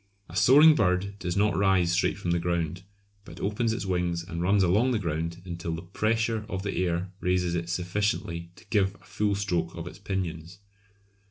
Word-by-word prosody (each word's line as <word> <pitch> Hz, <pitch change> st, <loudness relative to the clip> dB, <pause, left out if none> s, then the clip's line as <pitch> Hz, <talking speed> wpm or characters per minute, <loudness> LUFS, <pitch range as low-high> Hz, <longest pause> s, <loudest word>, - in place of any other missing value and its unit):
A 85 Hz, -, -11 dB
soaring 135 Hz, -, +7 dB
bird 100 Hz, -3 st, 0 dB
does 90 Hz, +1 st, -3 dB
not 105 Hz, -1 st, +2 dB
rise 95 Hz, -2 st, +3 dB
straight 90 Hz, +3 st, +1 dB
from 90 Hz, -4 st, -2 dB
the 85 Hz, -, +2 dB
ground, 85 Hz, 0 st, -2 dB, 0.4 s
but -, -, -12 dB
opens 105 Hz, +3 st, 0 dB
its 110 Hz, -, -3 dB
wings 90 Hz, -2 st, -1 dB
and 85 Hz, 0 st, -5 dB
runs 95 Hz, +2 st, +3 dB
along 105 Hz, +8 st, +3 dB
the -, -, +2 dB
ground 85 Hz, -2 st, -3 dB
until 85 Hz, -2 st, -4 dB
the 80 Hz, -, -7 dB
pressure 110 Hz, +4 st, 0 dB
of 95 Hz, 0 st, -3 dB
the 100 Hz, -, -3 dB
air 90 Hz, +1 st, -1 dB
raises 90 Hz, -2 st, 0 dB
it 85 Hz, -1 st, -2 dB
sufficiently 90 Hz, -1 st, -2 dB
to -, -, -17 dB
give 100 Hz, -2 st, +2 dB
a 95 Hz, -, -21 dB
full 100 Hz, +2 st, 0 dB
stroke 90 Hz, -5 st, -1 dB
of 85 Hz, -, -6 dB
its 85 Hz, +1 st, -9 dB
pinions. 90 Hz, -3 st, -4 dB
90 Hz, 190 wpm, -27 LUFS, 85-100 Hz, 0.4 s, soaring